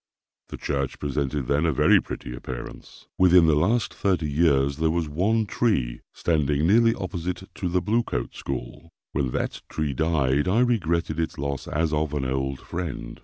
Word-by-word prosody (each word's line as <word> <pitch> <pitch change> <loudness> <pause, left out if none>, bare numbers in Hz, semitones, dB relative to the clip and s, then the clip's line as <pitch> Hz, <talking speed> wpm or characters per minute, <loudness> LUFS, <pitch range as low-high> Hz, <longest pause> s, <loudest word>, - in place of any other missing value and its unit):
The - - -7
church 70 -2 -2
presented 70 -1 -2
then 70 +4 +1
a - - +3
very 65 - +5
pretty - - -7
appearance. 60 -1 -9
Within 90 -2 +6
the 80 - +4
last 100 +10 +1
thirty 90 -6 0
years 70 -2 +2
there 80 0 +1
was 85 -1 0
one 105 +9 +1
tree 100 - 0
standing 75 -2 +1
nearly 115 +5 +4
opposite 90 -1 -4
to 90 - -3
the 90 0 0
Blue 115 +5 +2
Coat 60 - -4
School. 65 +5 -6 0.2
When 65 -2 0
that - - -3
tree 75 -3 -2
died, 75 -2 +1
I 105 +6 +3
regretted 85 -9 0
its 80 -1 -2
loss 70 -1 -3
as 80 0 0
of 75 0 0
an 70 -2 -1
old 65 +1 -2
friend. 75 -9 -5
80 Hz, 170 wpm, -25 LUFS, 70-90 Hz, 0.2 s, Within